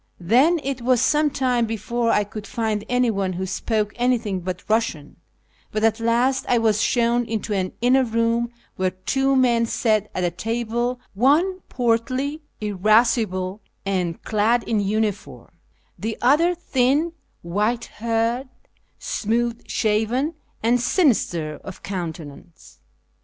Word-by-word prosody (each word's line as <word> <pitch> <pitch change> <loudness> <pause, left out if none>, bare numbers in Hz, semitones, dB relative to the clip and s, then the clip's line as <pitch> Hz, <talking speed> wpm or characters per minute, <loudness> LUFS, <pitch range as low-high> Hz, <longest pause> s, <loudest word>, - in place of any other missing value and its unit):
Then 255 - +4
it 270 -2 -3
was 250 0 +3
some 300 +4 +3
time 255 -4 +1
before 230 +2 -1
I 210 - +3
could 205 +1 -8
find 220 -3 -2
anyone 225 -7 +1
who 185 +2 -3
spoke 210 +2 -1
anything 240 -6 0
but 180 +1 -5
Eussian; 215 -10 -1 0.5
but 215 0 -2
at 225 0 +3
last 245 +3 +2
I 245 - +4
was 220 -2 +2
shown 240 0 +2
into 220 -1 -3
an 185 -2 -1
inner 255 +2 +4
room 230 0 0 0.3
where 185 0 +1
two 270 +9 0
men 240 -3 +3
sat 215 -3 +1
at 185 - -1
a 175 - +1
table, 235 +5 -2
one 305 - +3
portly, 255 +5 0 0.2
irascible, 210 -1 +1 0.2
and 180 -4 -1
clad 225 +2 +2
in 220 -2 0
uniform; 205 0 -2 0.5
the 220 +1 -3
other 325 +8 +3
thin, 295 0 +1 0.3
white 210 +7 0
haired, 230 +3 -1 0.5
smooth 235 +2 -1
shaven, 225 +8 0 0.3
and 240 +2 +3
sinister 215 - +1
of 190 - -10
countenance. 165 - -7
230 Hz, 130 wpm, -22 LUFS, 205-250 Hz, 0.5 s, Then